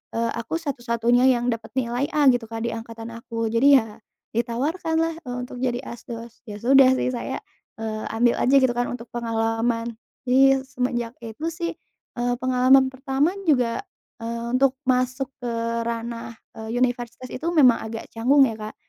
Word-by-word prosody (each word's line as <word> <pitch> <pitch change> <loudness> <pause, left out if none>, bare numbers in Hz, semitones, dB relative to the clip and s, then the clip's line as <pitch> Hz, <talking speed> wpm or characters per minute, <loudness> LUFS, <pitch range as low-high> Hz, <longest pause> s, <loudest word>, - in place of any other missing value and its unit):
eee, 230 0 0
aku 235 - -4
satu-satunya 245 -5 +1
yang 245 -1 +2
dapat 230 -1 -5
nilai 250 +2 0
A, 290 -2 +6
gitu, 245 -2 -1
Kak, 225 0 -5
di 235 - -1
angkatan 230 0 -7
aku. 230 -1 -4
Jadi, 275 +5 +6
ya 225 -3 +1 0.3
ditawarkanlah, 320 +8 -1
eee, 245 - -3
untuk 250 0 -6
jadi 250 0 -1
asdos. 235 -2 -9
Ya, 210 - -6
sudah 265 +1 +6
sih, 255 - 0
saya, 245 - -4 0.4
eee, 220 -1 -4
ambil 235 +1 +3
aja 265 +3 +3
gitu 260 -2 +5
kan 245 0 -1
untuk 240 -1 -6
pengalaman. 230 0 -1 0.3
Jadi, 255 0 +3 0.2
ya, - - +1
semenjak 250 -3 -2
itu 235 +7 -6
sih, 335 0 -3 0.4
eee, 245 0 0
pengalaman 255 +1 +4
pertama 270 +6 0
juga, 255 -2 +1 0.4
eee, 235 0 -4
untuk 265 0 +2
masuk 255 +1 +1 0.2
ke 240 - -2 0.3
ranah, 230 0 -5 0.2
eee, 220 0 -6
universitas 245 0 -1
itu 260 - -7
memang 270 -8 +5
agak 225 0 -6
canggung 265 +4 +5
ya, 225 - -4
Kak. 215 0 -8
245 Hz, 165 wpm, -24 LUFS, 230-265 Hz, 0.4 s, A